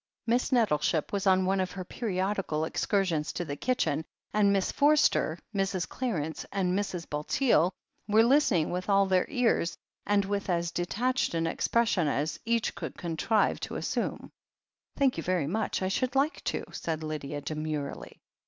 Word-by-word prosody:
Miss 240 +2 +1
Nettleship 165 - +1
was 200 0 0
on 185 0 +4
one 190 +1 +1
of 185 -1 -1
her 185 -1 -6
periodical 190 -6 -2
excur 195 +4 0
sions 155 -4 -1
to 175 - -3
the 145 - -4
kitchen, 160 - 0 0.3
and 205 -1 +4
Miss 195 -2 +1
Forster, 290 - +3 0.2
Mrs. 195 -2 -1
Clarence, 165 - -3
and 185 -2 0
Mrs. 185 -3 -2
Bulteel 170 - +2 0.4
were 215 +1 +5
listening 235 - +3
with 180 +3 -3
all 200 0 +5
their 185 -1 +2
ears, 235 -8 +1 0.3
and 205 -1 +3
with 200 0 -2
as 170 -1 0
detached 240 +5 0
an 165 0 +1
expression 215 -1 +1
as 145 +2 -1
each 230 0 +1
could - - -7
contrive 175 +6 +1
to - - -5
assume. - - -3 0.7
"Thank 270 -2 +2
you 165 - -3
very 180 -5 0
much, 200 +4 -1
I - - +1
should 250 +7 -1
like 280 +4 +1
to," - - -1
said 160 -1 -3
Lydia 150 -2 -4
demurely. 155 -1 -4
190 Hz, 160 wpm, -29 LUFS, 165-220 Hz, 0.7 s, were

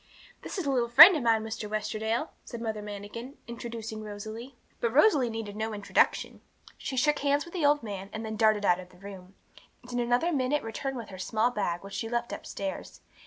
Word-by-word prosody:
'This - - -6
is 370 - -2
a 280 - +1
little 240 -3 +1
friend 335 +10 +11
of 305 - -1
mine, 225 -2 +2
Mr. 220 -1 -5
Westerdale,' 215 +5 -2
said 235 - -8
Mother 220 -2 -3
Manikin, 210 +6 -8
introducing 230 -2 -6
Rosalie. 215 +4 -8 0.2
But 235 - 0
Rosalie 295 - +5
needed 225 -2 -5
no 220 0 -3
introduction. 205 -1 +1 0.3
She 260 - -5
shook 295 +3 +3
hands 285 +1 +1
with 340 - -13
the 330 -6 +2
old 290 -2 +3
man, 195 -3 -6
and 220 0 -5
then 220 0 -4
darted 215 -2 +3
out 180 -1 +4
of 180 -1 -10
the 180 - -19
room, 190 -1 -11 0.5
and 245 - -12
in 245 - -1
another 245 +8 +1
minute 280 +1 0
returned 260 +4 -4
with 230 - -7
her 190 -2 -10
small 220 +6 +1
bag, 185 -6 -2
which 195 0 -10
she 225 - -3
had 230 - -7
left 235 0 -1
upstairs. 190 - -6
225 Hz, 215 wpm, -28 LUFS, 210-250 Hz, 0.5 s, friend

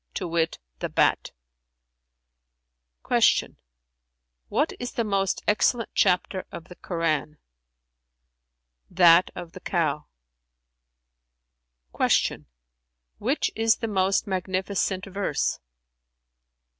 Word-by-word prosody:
to 185 - -3
wit, 165 -1 0 0.2
the - - -3
bat." - - +2 1.8
Q - - +2 1.3
"Which - - 0
is 245 0 -5
the 235 - 0
most 195 -3 -1
excellent 225 +2 +1
chapter 185 0 +1
of 170 - -9
the 180 - -11
Koran?" 155 -4 -2 1.5
"That 175 0 +6
of 175 -2 -8
The 185 - -10
Cow.[FN#352]" 60 - -4
Q 75 - -9 0.7
"Which 260 +8 0
is 225 0 +3
the 230 - -4
most 195 -1 +1
magnificent 190 0 -2
verse?" 195 -6 -2
175 Hz, 90 wpm, -25 LUFS, -, 1.8 s, That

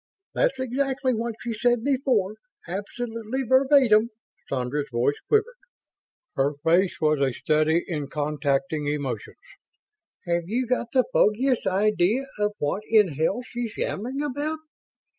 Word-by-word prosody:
"That's - - +1
exactly 260 +1 0
what 230 0 -2
she 235 -1 -3
said 240 +1 +1
before 255 -7 +1 0.3
absolutely 230 +6 -4
verbatim!" 260 -3 +4 0.4
Sandra's 135 +3 -2
voice 125 +4 +1
quivered, 450 +3 +1 0.8
her 140 +2 +1
face 175 +3 +2
was 155 -1 +2
a 135 -1 +2
study 155 +4 +1
in 150 -5 -3
contacting 145 0 -1
emotions. 140 -7 -3 0.9
"Have 170 -1 0
you 250 +4 0
got 245 0 -1
the 260 -1 +4
foggiest 245 +3 +2
idea 210 +5 +2
of 210 0 +1
what 145 +7 -1
in 215 -4 +5
hell 160 - -1
she's 240 -2 -5
yammering 255 +8 -2
about?" 295 +3 -2
215 Hz, 125 wpm, -25 LUFS, 155-255 Hz, 0.9 s, in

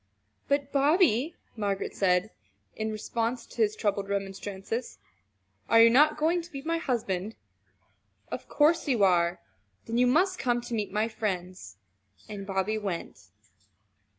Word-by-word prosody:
"But, 280 0 0
Bobby," 290 - +3 0.2
Margaret 200 -3 -2
had - - -19
said 185 +2 +2 0.4
in 220 0 -2
response 230 +2 -2
to - - -16
his 215 -1 +2
troubled 200 -2 -1
remonstrances, 195 - -4 0.7
"are 230 - +6
you 230 0 +8
not 300 +5 +5
going 330 +3 +1
to 340 +1 -13
be 275 -1 -7
my 330 +1 -1
husband? 220 - -2 1.0
Of - - -6
course 310 +2 +3
you 240 -7 +2
are! 175 -2 +3 0.4
Then 230 +1 -1
you 250 - +5
must 360 +8 +2
come 245 -2 +1
to 240 - -7
meet 210 -3 -2
my 210 +2 +1
friends." 185 - -4 0.5
And 200 -2 -7
Bobby 195 +2 -1
went. 175 - -6
220 Hz, 145 wpm, -28 LUFS, 195-275 Hz, 1.0 s, you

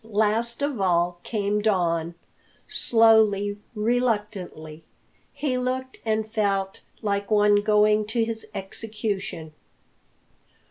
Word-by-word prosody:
Last 225 +3 0
of 285 -7 -1
all 175 -1 +1
came 210 -1 -1
Don 170 -5 0 0.5
slowly, 215 -3 +3 0.2
reluctantly. 210 -9 -2 0.5
He 260 -4 -2
looked 260 +1 -3
and 220 -1 -1
felt 200 -3 -1 0.2
like 200 -1 -1
one 210 -1 +4
going 210 0 +3
to 225 +1 0
his 225 -1 -5
execution. 195 -5 -5
210 Hz, 95 wpm, -25 LUFS, 195-225 Hz, 0.5 s, one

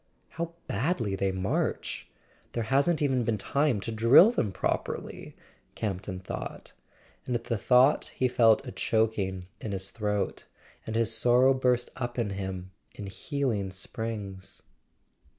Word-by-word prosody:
"How 170 0 -5
badly 115 - -1
they 95 0 0
march—there 95 +4 -4
hasn't 140 +7 +2
even 130 -3 +2
been 115 -1 0
time 140 +2 +1
to 115 - -4
drill 115 - +7
them 110 - 0
properly!" - - -3 0.4
Campton 95 -2 -3
thought; 90 - -6 0.5
and 125 - 0
at 115 - -2
the 115 - -1
thought 125 +5 +4
he 130 - +2
felt 120 +1 +4
a 125 - -6
choking 105 -6 0
in 105 - -4
his 95 0 -2
throat, 105 -2 -2 0.4
and 110 - -3
his 115 0 +1
sorrow 125 +3 +5
burst 125 -2 +1
up 120 -2 -4
in 115 -4 0
him 95 -1 -5 0.2
in 105 - -7
healing 115 - -2
springs. 100 0 -5
115 Hz, 135 wpm, -28 LUFS, 100-125 Hz, 0.5 s, drill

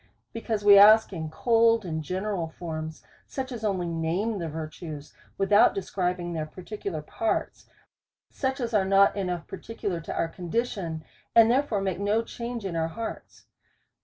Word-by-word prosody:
Because 225 -2 -3
we 200 -1 +9
ask 215 +1 +7
in 160 -3 -4
cold 230 +5 +3
and 160 -2 -3
general 185 +2 -2
forms, 160 -2 -6 0.2
such 265 -1 -5
as 235 -3 -6
only 190 -4 0
name 170 +6 -1
the 165 -2 -3
virtues 155 -1 -7 0.2
without 205 +1 +5
describing 180 -2 -2
their 155 -2 -3
particular 185 -1 -6
parts, 225 +8 -2 0.6
such 265 -1 -2
as 235 -2 -3
are 205 -3 +4
not 195 +1 +4
enough 180 -5 -3
particular 195 -4 -5
to - - -6
our 165 - 0
condition, 175 -2 -3 0.3
and 230 0 +7
therefore 250 -6 +1
make 190 -2 -2
no 210 +3 +1
change 235 -1 -6
in 180 -3 -3
our 160 -1 0
hearts. 225 +7 -7
195 Hz, 155 wpm, -27 LUFS, 165-225 Hz, 0.6 s, we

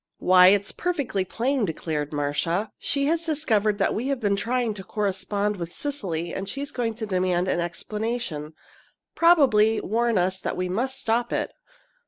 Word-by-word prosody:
"Why, 180 0 +6
it's 200 +1 +3
perfectly 280 - -1
plain," 255 +6 0
declared 155 -4 -2
Marcia. 155 +7 -1
"She 280 -1 0
has 330 +3 +1
discovered 225 - +1
that 195 - +1
we 235 +5 -2
have 275 -2 -1
been 205 -3 +1
trying 235 +2 0
to 195 -2 -8
correspond 205 +1 -1
with 170 -1 -5
Cecily, 175 - -4
and 195 +1 -4
she's 280 +5 -4
going 230 -3 -2
to 220 0 -4
demand 185 -2 0
an 185 - +1
explanation 175 -3 -3 0.6
probably 255 -11 +5
warn 230 0 0
us 185 +1 +1
that - - -3
we 180 0 -1
must 255 +8 -1
stop 235 +1 0
it. - - -1
210 Hz, 165 wpm, -25 LUFS, 185-245 Hz, 0.6 s, Why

